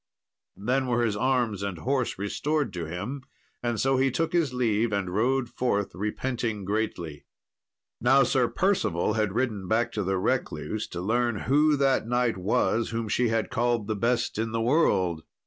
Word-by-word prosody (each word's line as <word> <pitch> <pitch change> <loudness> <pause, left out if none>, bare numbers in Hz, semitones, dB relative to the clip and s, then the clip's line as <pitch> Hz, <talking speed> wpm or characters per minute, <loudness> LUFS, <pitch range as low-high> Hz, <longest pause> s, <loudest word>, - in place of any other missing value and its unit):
Then 130 +6 0
were 120 -1 +2
his 105 -3 0
arms 120 -3 0
and 100 -3 -3
horse 130 - -1
restored 140 +6 -1
to 85 -2 -4
him, 100 - -5 0.4
and 120 -2 -1
so 135 0 +2
he 135 +1 +3
took 165 +7 -1
his 165 -6 +2
leave, 115 -3 +1
and 95 -3 -2
rode 125 +4 +1
forth, 105 -5 -1
repenting 105 +2 -3
greatly. 90 -8 -3 0.7
Now 135 +3 +5
Sir 125 -2 +2
Percival 110 - +1
had 105 -3 0
ridden 110 -7 -1
back 110 +4 +1
to 105 - -2
the 95 +1 0
recluse, 105 +3 -2
to 85 - -6
learn 120 +3 0
who 150 +4 +3
that 135 -4 +2
knight 120 -3 +1
was 110 +4 +1
whom 115 -1 -3
she 120 +3 +2
had 115 -1 -1
called 120 -2 +1
the 110 +1 -2
best 115 +1 0
in 110 0 -2
the 115 - 0
world. 95 - +2
115 Hz, 170 wpm, -27 LUFS, 100-130 Hz, 0.7 s, Now